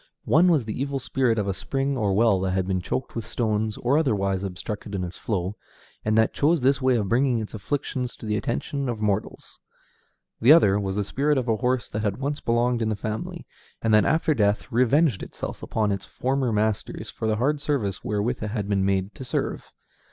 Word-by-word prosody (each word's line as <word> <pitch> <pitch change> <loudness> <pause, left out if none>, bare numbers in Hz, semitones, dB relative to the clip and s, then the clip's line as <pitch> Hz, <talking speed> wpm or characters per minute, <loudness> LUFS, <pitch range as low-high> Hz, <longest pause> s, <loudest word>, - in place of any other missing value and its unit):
One 170 +4 +5
was 155 -9 +3
the 105 - -3
evil 140 0 -1
spirit 130 -3 0
of 105 -2 0
a 100 - 0
spring 135 +7 -2
or 105 -6 +1
well 110 -3 +4
that 95 0 -1
had 95 -1 0
been 95 -1 -1
choked 130 - -3
with 115 - -2
stones, 110 -2 -1
or 135 +5 +2
otherwise 100 -9 0
obstructed 100 +2 -5
in 95 - -2
its 90 0 -7
flow, 95 -2 -2 0.5
and 110 0 +1
that 110 0 +3
chose 155 +1 +2
this 135 +2 +3
way 130 -1 +3
of 105 -4 0
bringing 125 +3 +2
its 110 -2 -4
afflictions 125 +3 -3
to - - -10
the 105 -1 0
attention 125 - -2
of 115 -3 -3
mortals. 105 -1 -2 0.8
The 125 +7 +8
other 105 -12 +5
was 95 -1 -2
the 105 - 0
spirit 140 +8 +1
of 125 -2 -1
a 110 -1 +2
horse 125 0 0
that 105 - -4
had 105 -2 -1
once 145 +2 -2
belonged 120 +1 +1
in 110 - +1
the 110 - 0
family, 110 +2 -5 0.3
and 115 -1 +1
that 110 -2 +6
after 160 0 +2
death 105 0 +1
revenged 130 - +3
itself - - -6
upon 105 -2 0
its 100 -1 -2
former 130 -1 -1
masters 105 0 -1
for 110 - -4
the 110 - +2
hard 140 +6 0
service 110 -11 -1
wherewith 105 +4 -1
it 105 - -2
had 105 -2 -3
been 100 -2 +1
made 95 +1 0
to - - -8
serve. 125 - -3
110 Hz, 215 wpm, -25 LUFS, 100-130 Hz, 0.8 s, The